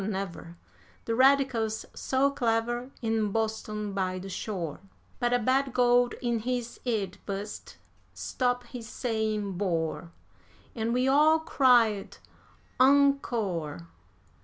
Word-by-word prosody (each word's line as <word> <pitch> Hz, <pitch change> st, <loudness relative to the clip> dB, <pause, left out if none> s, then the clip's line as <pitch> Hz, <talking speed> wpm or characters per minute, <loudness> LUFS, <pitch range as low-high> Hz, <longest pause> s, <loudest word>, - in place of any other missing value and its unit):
never, 190 Hz, -4 st, -5 dB, 0.5 s
The 230 Hz, -, -1 dB
Radicals 255 Hz, -4 st, +3 dB
so 270 Hz, +1 st, +1 dB
clever, 240 Hz, -1 st, -1 dB
in 220 Hz, -2 st, 0 dB
Boston 215 Hz, -1 st, -2 dB
by 185 Hz, -1 st, -1 dB
the 190 Hz, +1 st, -7 dB
shore; 180 Hz, -5 st, -4 dB, 0.4 s
But 240 Hz, -2 st, +1 dB
a 245 Hz, -, +4 dB
bad 260 Hz, +2 st, +1 dB
gold 245 Hz, -1 st, +3 dB
in 235 Hz, -1 st, 0 dB
his 240 Hz, +1 st, -3 dB
'ead 205 Hz, -6 st, -2 dB
bust 200 Hz, +1 st, -6 dB, 0.3 s
stop 245 Hz, -1 st, -1 dB
his 235 Hz, -3 st, -9 dB
saying 215 Hz, -6 st, -2 dB
bore, 170 Hz, -3 st, -2 dB, 0.6 s
And 225 Hz, 0 st, -2 dB
we 250 Hz, +2 st, +1 dB
all 300 Hz, +4 st, +5 dB
cried 245 Hz, -10 st, +3 dB, 0.6 s
encore. 235 Hz, -, +2 dB
225 Hz, 110 wpm, -28 LUFS, 200-250 Hz, 0.6 s, all